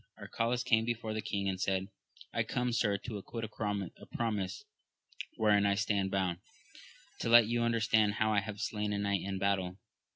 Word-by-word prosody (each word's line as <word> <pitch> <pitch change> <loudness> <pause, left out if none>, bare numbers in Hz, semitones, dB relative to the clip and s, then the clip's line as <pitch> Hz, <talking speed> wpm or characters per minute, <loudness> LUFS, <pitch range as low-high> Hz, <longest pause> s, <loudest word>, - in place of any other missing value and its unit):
Arcalaus 120 +2 -1
came 110 -1 +4
before 115 -1 -2
the 110 - -2
king 100 -1 -2
and 95 -1 -2
said, 95 -1 0 0.5
I - - +1
come, 125 -1 -1
sir, 105 -4 +1
to 105 +1 -6
acquit 115 +3 -6
a 105 -4 -4
promise 105 -5 -2 0.7
wherein 105 -2 +4
I 100 - +3
stand 100 -2 0
bound, 95 -3 0 0.8
to - - -1
let 120 -1 +8
you 120 +2 0
understand 110 -3 +2
how 110 0 +2
I 105 - +4
have 105 0 -6
slain 105 -1 -2
a - - -1
knight 100 -2 0
in 95 0 -3
battle. 95 -1 0
105 Hz, 175 wpm, -32 LUFS, 100-115 Hz, 0.8 s, let